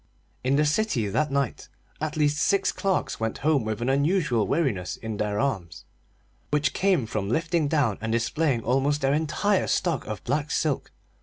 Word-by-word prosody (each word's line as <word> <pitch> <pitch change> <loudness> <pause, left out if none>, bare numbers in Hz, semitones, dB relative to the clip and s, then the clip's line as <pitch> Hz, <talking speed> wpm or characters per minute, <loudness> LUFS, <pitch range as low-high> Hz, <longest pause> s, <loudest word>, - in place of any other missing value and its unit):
In 130 +2 +2
the 150 +1 +3
city 150 - +1
that 150 +10 0
night 140 -3 -1 0.3
at 155 0 -2
least 150 -1 +2
six 200 +5 +2
clerks 195 -1 -1
went 110 0 -2
home 150 -5 +3
with 110 0 -3
an 125 - 0
unusual 140 - +2
weariness 130 - -1
in 110 -2 -5
their 105 0 -1
arms, 105 -12 -2 0.6
which 150 0 +1
came 185 -10 +2
from 105 -3 -3
lifting 165 +4 +1
down 140 -9 +1
and 115 0 -2
displaying 120 +2 0
almost 135 +4 +1
their 135 +1 +2
entire 160 +6 +1
stock 170 -8 0
of 105 -3 -5
black 145 +4 -1
silk. 150 -3 -1
140 Hz, 170 wpm, -26 LUFS, 115-155 Hz, 0.6 s, the